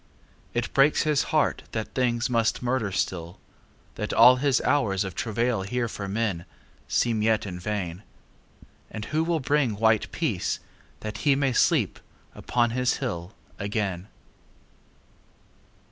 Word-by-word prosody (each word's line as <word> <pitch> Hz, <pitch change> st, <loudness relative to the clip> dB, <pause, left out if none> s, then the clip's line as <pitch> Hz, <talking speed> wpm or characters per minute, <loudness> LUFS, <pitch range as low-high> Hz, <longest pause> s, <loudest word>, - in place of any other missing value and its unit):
It 120 Hz, 0 st, -2 dB
breaks 140 Hz, +2 st, +4 dB
his 150 Hz, -2 st, +2 dB
heart 155 Hz, -1 st, +1 dB
that 110 Hz, -1 st, -4 dB
things 120 Hz, -2 st, +1 dB
must 115 Hz, -1 st, 0 dB
murder 120 Hz, -5 st, 0 dB
still, 85 Hz, -2 st, -3 dB, 0.6 s
That 105 Hz, -, -2 dB
all 125 Hz, +3 st, +8 dB
his 140 Hz, -1 st, +2 dB
hours 110 Hz, -9 st, +1 dB
of 95 Hz, -2 st, -5 dB
travail 115 Hz, +2 st, -1 dB
here 120 Hz, +5 st, -2 dB
for 100 Hz, -2 st, -6 dB
menSeem 105 Hz, +2 st, -2 dB
yet 110 Hz, 0 st, +2 dB
in 90 Hz, -3 st, -6 dB
vain. 90 Hz, -2 st, -3 dB, 0.9 s
And 110 Hz, -1 st, -6 dB
who 155 Hz, +5 st, 0 dB
will 165 Hz, -1 st, 0 dB
bring 135 Hz, -4 st, +1 dB
white 110 Hz, 0 st, +2 dB
peaceThat 110 Hz, 0 st, -4 dB
he 140 Hz, +3 st, +3 dB
may 135 Hz, -2 st, +1 dB
sleep -, -, +2 dB, 0.3 s
upon 120 Hz, -1 st, 0 dB
his 125 Hz, +1 st, +1 dB
hill 95 Hz, -7 st, -5 dB, 0.2 s
again? 100 Hz, -3 st, -2 dB
115 Hz, 130 wpm, -26 LUFS, 100-130 Hz, 0.9 s, all